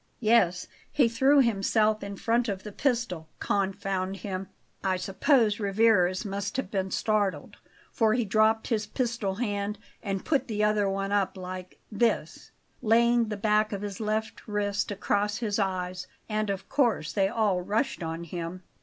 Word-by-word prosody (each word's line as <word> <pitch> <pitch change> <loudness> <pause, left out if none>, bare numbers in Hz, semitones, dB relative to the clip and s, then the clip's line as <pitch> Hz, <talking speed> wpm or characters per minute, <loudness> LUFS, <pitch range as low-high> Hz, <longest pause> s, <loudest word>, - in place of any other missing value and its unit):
"Yes; 215 -6 +3 0.3
he 270 -5 +4
threw 265 +5 +4
himself 215 -1 +2
in 200 0 -5
front 230 +3 +1
of 190 -1 -4
the 210 - -7
pistol 230 - -1
confound 195 -1 -1
him! 190 0 -5 0.4
I 190 -1 +1
suppose 210 +3 +2
Rivarez 200 -2 +3
must 200 +3 -3
have 265 -8 -3
been 190 -2 -1
startled, 205 -1 -1 0.3
for 220 -1 +2
he 240 -2 +1
dropped 215 +2 +2
his 215 -3 0
pistol 235 -6 -2
hand 205 -2 -2 0.2
and 195 -3 -3
put 285 -4 +1
the 210 -2 -1
other 210 -1 +2
one 195 0 -2
up 200 -2 +1
like 185 0 -7
this" 230 +2 0 0.3
laying 235 +1 +4
the 210 -1 -4
back 210 +1 +2
of 200 -1 -4
his 200 -2 -5
left 215 0 -3
wrist 205 -1 -1
across 205 +1 0
his 220 -3 -1
eyes 185 -2 -2 0.2
"and 215 -1 -1
of 195 -1 -3
course 230 - +1
they 195 -2 +3
all 200 -3 +1
rushed 205 +6 -1
on 165 0 -4
him." 170 +2 -6
205 Hz, 160 wpm, -28 LUFS, 190-225 Hz, 0.4 s, he